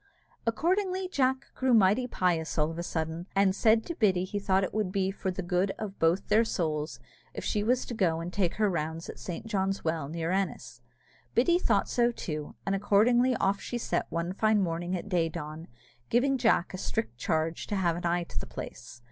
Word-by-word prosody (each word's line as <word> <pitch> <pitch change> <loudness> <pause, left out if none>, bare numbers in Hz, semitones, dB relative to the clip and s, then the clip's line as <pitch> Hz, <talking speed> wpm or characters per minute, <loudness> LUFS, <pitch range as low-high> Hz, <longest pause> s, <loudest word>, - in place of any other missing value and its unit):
Accordingly, 370 - +1
Jack 265 -5 +1
grew 260 -2 +2
mighty 215 +4 +4
pious 175 -8 0
all 155 +1 +2
of 165 - -6
a - - -1
sudden, 165 +1 -3
and 195 -1 +4
said 220 +1 +4
to 340 - -3
Biddy 190 - +2
that - - -13
he 205 - -1
thought 195 -1 +2
it 185 - -3
would 210 -3 0
be 190 -1 0
for 190 - -3
the 185 +1 -3
good 180 +2 +1
of 205 -2 -6
both 165 +4 +2
their 215 +2 +5
souls 155 - -2 0.4
if - - -5
she 210 - 0
was 245 +4 +1
to - - -6
go 175 -7 +1
and 170 +2 -5
take 185 -4 0
her 215 -1 +2
rounds 165 -2 -3
at - - -8
Saint 175 +4 -6
John's 195 -3 -1
Well, 160 -3 -1
near 165 +1 -2
Ennis. 135 -11 -2 0.5
Biddy 340 +9 +4
thought - - +2
so 240 -1 +2
too, 155 -9 -5
and 195 - 0
accordingly 240 +6 +3
off 195 -2 +1
she 240 - -4
set 240 - -1
one 170 +2 -2
fine 215 +1 +3
morning 175 0 -1
at 180 - -5
day 175 -4 +1
dawn, 155 0 -7 0.4
giving 270 +3 +3
Jack 220 -7 +2
a 185 - -5
strict 115 -6 -3
charge 160 +4 -1
to 205 - -2
have 175 -4 +1
an 175 0 -2
eye 175 +1 +1
to - - -5
the - - -7
place. 120 - -8
190 Hz, 215 wpm, -29 LUFS, 165-220 Hz, 0.5 s, their